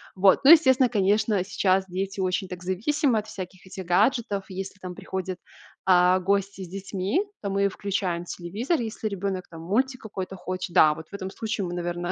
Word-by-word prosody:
Вот, 190 +4 +4
ну, 275 - +9
естественно, 260 -6 +6
конечно, 205 -2 +2
сейчас 190 -1 +1
дети 195 +2 -4
очень 185 0 0
так 180 -1 -8
зависимы 230 - +1
от 210 - -8
всяких 185 -1 -8
этих 185 0 -7
гаджетов. 205 +2 +1
Если 195 +1 -6
там 185 -1 -7
приходят, 190 -1 -4 0.5
а, 180 0 +5
гости 195 +1 -1
с - - -8
детьми, 195 - -2 0.2
то 200 - -3
мы 200 0 +2
включаем 185 -3 -2
телевизор, 205 - -2
если 220 -1 -4
ребенок 195 -2 -3
там 165 -1 -10
мультик 255 +9 0
какой-то 195 -3 -6
хочет, 185 -1 -5
да, 155 -1 +7
вот 160 0 -10
в - - -24
этом 190 -1 -5
случае 215 -1 -3
мы, 175 - -5
наверное, 175 0 -3
190 Hz, 185 wpm, -26 LUFS, 185-210 Hz, 0.5 s, ну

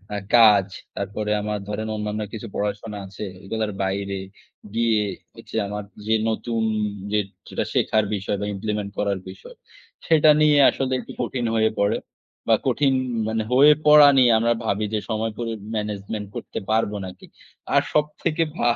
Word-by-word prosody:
আ - - -1 0.2
কাজ। 105 -5 +7 0.3
তারপরে 105 +2 -3
আমার 105 0 -3
ধরেন 110 +1 -3
অন্যান্য 105 0 -3
কিছু 115 +1 -6
পড়াশোনা 105 +1 -3
আছে। 95 +2 -7 0.2
এগুলোর 110 +1 -2
বাইরে 100 0 -2 0.6
গিয়ে 115 -2 +2 0.3
হচ্ছে - - -12
ঐযে - - +1
আমার 105 +1 -5 0.2
যে, 110 - +2 0.2
নতুন 115 +1 -2 0.5
যে 105 - +2 0.3
যেটা - - -2
শেখার 110 -1 +2
বিষয় 100 +1 -2
বা, 100 - -1
implement 105 0 -3
করার 100 -2 0
বিষয়, 95 - -12 0.5
সেটা 155 -1 +5
নিয়ে 150 -1 +5
আসলে 135 -1 -2
একটু - - -9
কঠিন 120 0 -2
হয়ে 110 0 +3
পড়ে 100 0 +2 0.5
বা, - - +6
কঠিন 140 -2 +2 0.3
মানে 110 0 -1
হয়ে 145 +4 +7
পড়া 150 -1 +9
নিয়ে 125 -2 +6
আমরা 115 +1 +2
ভাবি 105 0 0
যে, 110 - +1
সময় 110 0 -1
করে 115 -1 -2 0.2
management 105 0 -4
করতে - - -5
পারব 110 -1 +2
নাকি। 90 - -10 0.5
আর - - +5
সবথেকে 150 +2 0
ভা 120 0 +3
110 Hz, 160 wpm, -23 LUFS, 105-120 Hz, 0.6 s, পড়া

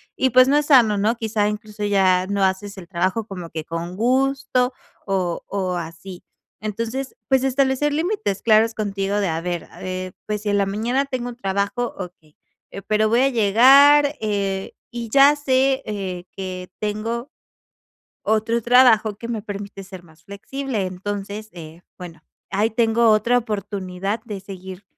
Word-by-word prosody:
y 260 - +2
pues, 255 +2 +6
no 285 +2 +4
es 295 0 0
sano, 235 -8 +5
¿no? 215 +4 +1
Quizá, 220 -2 0
incluso 210 0 -6
ya 190 -2 +3
no 200 0 0
haces 190 +1 -1
el 180 -3 -10
trabajo 185 +6 -1
como 180 -5 -7
que 160 -1 -6
con 170 +2 -5
gusto 260 +1 +1 0.3
o 185 -4 -1
o 185 -2 -2
así. 170 +2 -8 0.4
Entonces, 230 +5 -4
pues, 265 -1 +3
establecer 270 +2 +1
límites 315 - -1
claros 225 0 +4
contigo, 200 -1 -2
de 200 -3 0
a 160 0 -2
ver, 175 -1 -3
a - - -14
ver. 185 0 -5
Pues, 210 0 -3
si 210 - -1
en 205 - +2
la 200 - +2
mañana 235 +7 0
tengo 255 -3 -4
un 245 - -8
trabajo, 200 +3 -2
okey, 175 -5 -10 0.4
eh, 195 - -7
pero 215 +1 +1
voy 235 +3 +3
a 270 - +4
llegar, 275 +6 +6
eh, 200 -2 -2 0.2
y 235 -1 -5
ya 280 +4 +6
sé, 270 -1 +1
eh, 190 -4 -5
que 185 -1 -6
tengo 225 +5 -3 1.0
otro 220 +2 +1
trabajo 230 -3 +5
que 230 - -7
me 225 -3 -3
permite 200 -1 -7
ser 185 -1 -10
más 160 -1 -21
flexible. 220 +3 -4
Entonces, 205 +3 -6
eh, 165 0 -11
bueno, 165 -3 -10 0.3
ahí 210 +3 +1
tengo 230 +1 +3
otra 220 +3 +3
oportunidad 200 -2 -3
de 210 -4 -6
seguir, 190 0 -9
210 Hz, 165 wpm, -22 LUFS, 190-240 Hz, 1.0 s, pues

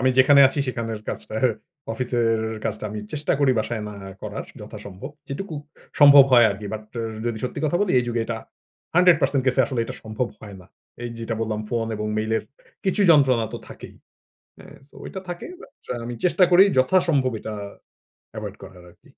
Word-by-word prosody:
আমি 130 0 +3
যেখানে 140 +2 +7
আছি 135 - -5
সেখানের 115 -3 -4
কাজটার 110 +4 -3 0.5
অফিসের 120 -2 0 0.3
কাজটা 110 -1 -3
আমি 105 0 -5
চেষ্টা 150 0 0
করি 135 -2 +4
বাসায় 110 0 -2
না 105 - -8 0.3
করার - - -5 0.2
যথাসম্ভব 100 +8 -9 0.2
যেটুকু 160 +5 -5 0.5
সম্ভব 145 -1 +10
হয় 120 -2 +8
আরকি 100 +1 -6
but 110 - -6 0.2
র - - -1 0.3
যদি 115 -2 -2
সত্যি 125 - -4
কথা 155 +3 +1
বলি 205 -3 +1
এই 125 - 0
যুগে 120 -1 -1
এটা 115 0 -3 0.6
100% 165 -6 +4
কেসে 130 +1 +3
আসলে 130 -4 -2
এটা - - -7
সম্ভব 110 +2 -3
হয় 100 -2 -10
না। 90 - -16 0.4
এই 120 - -3
যেটা 115 0 -3
বললাম 110 -1 -2
ফোন 115 -1 -1
এবং 105 0 -3
মেইলের 110 +1 0 0.4
কিছু 190 +2 +1
যন্ত্রণা 135 -7 +5
তো - - -5
থাকেই। - - -11 0.7
এ - - -14 0.2
সো - - -23
এটা 190 - -7
থাকে 175 -1 -6 0.2
but - - -14 0.2
আ - - -4
আমি 120 0 -5
চেষ্টা 180 +1 +4
করি 180 +2 +8
যথাসম্ভব 140 -2 +3
এটা 110 - -6 0.8
এভয়েড 105 -2 -6
করার 90 -2 -13
আরকি। - - -24
120 Hz, 180 wpm, -23 LUFS, 110-140 Hz, 0.8 s, সম্ভব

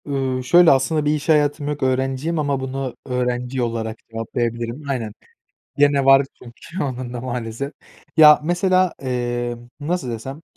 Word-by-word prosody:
Iıı, 135 -2 -2
şöyle, 175 +6 +6
aslında 145 +3 +2
bir 150 - +2
iş 150 +1 -5
hayatım 145 -1 +2
yok 145 -1 -3
öğrenciyim 135 +5 0
ama 140 -2 0
bunu 130 -1 -4
öğrenci 125 0 -2
olarak 115 -1 -3
cevaplayabilirim. 120 +4 -3
Aynen. 115 -6 -3 0.6
Gene 145 -1 +3
var 135 0 +6 0.2
çünkü 145 +9 -7
onun 130 -2 -4
da 120 - -5
maalesef. 125 +2 -4 0.5
Ya, 150 -1 +9
mesela, 185 +2 +2
emm, 120 -2 -3
nasıl 150 -2 -2
desem, 130 +6 -7
130 Hz, 140 wpm, -21 LUFS, 120-145 Hz, 0.6 s, Ya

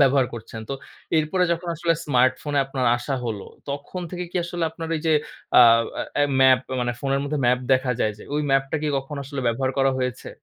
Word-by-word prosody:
ব্যবহার 135 -2 +4
করছেন। 115 0 -8
তো - - -3 0.5
এরপরে 155 +4 +1
যখন 170 +1 -4
আসলে 165 +1 +2
স্মার্টফোনে 130 +2 +2
আপনার 135 -2 -1
আসা 120 +3 -3
হলো, 110 -4 -4 0.3
তখন 145 +6 -5
থেকে 180 0 -4
কি - - -4
আসলে 175 -1 -2
আপনার 165 0 -7
এই - - -4
যে 160 - +4 0.5
আ - - +10 0.6
অ্যা 145 - +4 0.2
ম্যাপ, 130 -1 +6 0.2
মানে 120 0 0
ফোনের 135 0 0
মধ্যে 145 +1 -2
ম্যাপ 125 +1 +4
দেখা 130 0 +2
যায় 110 - +2
যে, - - -11
ওই 150 - +1
ম্যাপটা 135 +2 +2
কি 155 - 0
কখনো 135 +2 -4
আসলে 140 0 -5
ব্যবহার 130 +3 +1
করা 135 0 +4
হয়েছে? 125 -3 -3
135 Hz, 200 wpm, -23 LUFS, 130-150 Hz, 0.6 s, আ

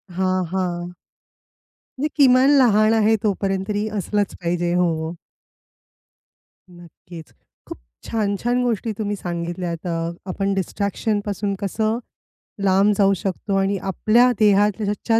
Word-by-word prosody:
हां, 185 0 0
हां. 175 -2 -2 1.1
म्हणजे 300 +3 0
किमान 255 +1 +5
लहान 215 -4 +4
आहे 220 0 +3
तोपर्यंत 195 -2 0
तरी 210 0 -1
असलंच 205 0 -1
पाहिजे 175 0 -1
हो. 165 -2 0 1.6
नक्कीच. 175 -1 -13 0.4
खूप - - -8 0.3
छान 205 -3 -1
छान 245 +1 0
गोष्टी 230 -2 -1
तुम्ही 205 -1 -2
सांगितल्यात, 175 -1 -4
अ 165 -1 -2 0.2
आपण 195 +2 -1
डिस्ट्रॅक्शन 200 +2 -1
पासून 205 0 -2
कसं 215 +3 -1 0.7
लांब 195 +2 +4
जाऊ 195 -1 +4
शकतो 195 +1 -3
आणि 195 +1 +1
आपल्या 235 +6 +3
देहाच्या 210 +1 +2
200 Hz, 115 wpm, -21 LUFS, 180-215 Hz, 1.6 s, किमान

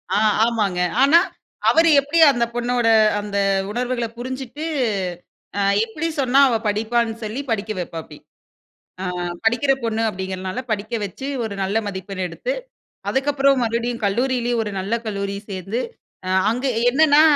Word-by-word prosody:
ஆ - - +3 0.3
ஆமாங்க. 210 -6 0 0.2
ஆனா, 285 +5 +7 0.5
அவரு 330 +1 +5
எப்டி 290 +4 0
அந்த 240 -3 +1
பொண்ணோட 240 0 0 0.3
அந்த 205 -1 -4 0.3
உணர்வுகள 245 +1 -1
புரிஞ்சுட்டு, 260 +4 -5 0.9
ஆ - - +1 0.2
எப்டி 300 +9 -4
சொன்னா 265 0 +3
அவ 235 - +1
படிப்பான்னு 225 +2 0
சொல்லி 220 +5 -3
படிக்க 215 0 -1
வைப்பாப்டி. 165 -3 -7 0.8
அ - - -3 0.4
படிக்கிற 245 +5 +3
பொண்ணு 225 -1 -1
அப்படிங்கிறனால, 190 +2 -4
படிக்க 215 +1 -2
வச்சு 205 +8 -7 0.2
ஒரு 220 -2 -4
நல்ல 195 +3 0
மதிப்பெண் 190 -1 -5
எடுத்து, - - -3 0.6
அதுக்கப்புறம் 275 -1 +2
மறுபடியும் 235 0 -2
கல்லூரியிலயே, 240 +3 0
ஒரு 210 - -5
நல்ல 195 +4 -3
கல்லூரி 200 -1 -3 0.2
சேர்ந்து, 195 +5 -3 0.5
அ - - -2 0.2
அங்கே 255 +3 -1 0.2
என்னன்னா, 295 +3 +5
235 Hz, 130 wpm, -21 LUFS, 205-260 Hz, 0.9 s, ஆனா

